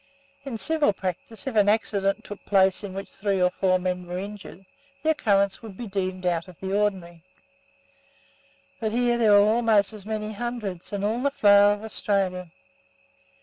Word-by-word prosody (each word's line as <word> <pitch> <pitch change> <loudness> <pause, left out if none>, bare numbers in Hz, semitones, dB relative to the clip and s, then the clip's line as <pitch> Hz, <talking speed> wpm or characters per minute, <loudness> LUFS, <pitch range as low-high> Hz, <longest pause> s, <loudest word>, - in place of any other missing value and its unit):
In 255 -5 -4
civil 310 -3 +2
practice, 195 +6 -4
if 265 -4 -4
an 205 -1 +4
accident 200 -2 0
took 205 - -10
place 190 0 +3
in 190 -2 -7
which 195 +1 -5
three 195 -1 -1
or 180 0 +3
four 185 0 +1
men 180 -1 -3
were 175 +1 -4
injured, 195 -1 -8 0.4
the 315 - +3
occurrence 200 -9 +1
would 215 -5 -10
be 240 - -6
deemed 185 -2 -3
out 170 0 0
of 180 -3 -15
the 190 +1 -3
ordinary: 185 -5 -2 1.6
but 220 -2 -2
here 240 +1 +1
there 220 -3 +5
were 205 0 +6
almost 220 -2 +3
as 210 -2 -10
many 215 0 -4
hundreds, 215 -6 -5
and 200 -1 -2
all 225 +4 -1
the 280 - +2
flower 205 -5 +5
of 205 +1 -7
Australia. 195 -4 -2
200 Hz, 175 wpm, -25 LUFS, 190-220 Hz, 1.6 s, were